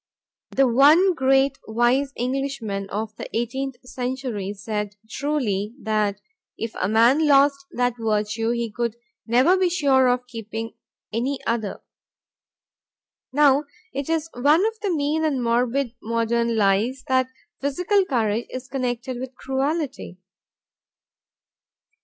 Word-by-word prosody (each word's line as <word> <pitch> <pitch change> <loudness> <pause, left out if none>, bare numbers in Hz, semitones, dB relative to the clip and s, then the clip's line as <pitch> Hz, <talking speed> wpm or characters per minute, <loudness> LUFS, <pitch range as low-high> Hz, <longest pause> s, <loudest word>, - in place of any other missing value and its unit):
The 270 -1 +3
one 300 +10 +6
great, 270 -2 +2
wise 240 +5 +2
Englishman 245 -6 -3
of 215 +1 -4
the - - -7
eighteenth 265 +3 -2
century 250 -6 -3
said 210 0 -4
truly 225 -6 -2
that 210 -3 -1 0.4
if 225 0 -4
a 185 - +1
man 240 +8 +4
lost 275 -1 +4
that 245 0 +1
virtue 215 0 0
he 235 -1 -1
could 235 0 -2 0.3
never 255 +10 +4
be 370 -1 +2
sure 275 -7 +3
of 250 0 +1
keeping 225 -1 -6 0.4
any 255 +5 -1
other. 225 -3 -2 1.5
Now 290 +1 +4 0.3
it 280 +2 -4
is 325 -1 0
one 295 - +3
of 445 0 -2
the 410 -1 -2
mean 310 -1 0
and 280 -5 0
morbid 240 +2 +1
modern 230 +1 0
lies 215 +6 +2
that 260 -1 +2 0.3
physical 360 +9 +2
courage 230 - 0
is 255 0 -7
connected 250 -2 -3
with 260 0 -7
cruelty. 270 - -2
250 Hz, 125 wpm, -23 LUFS, 225-280 Hz, 1.5 s, one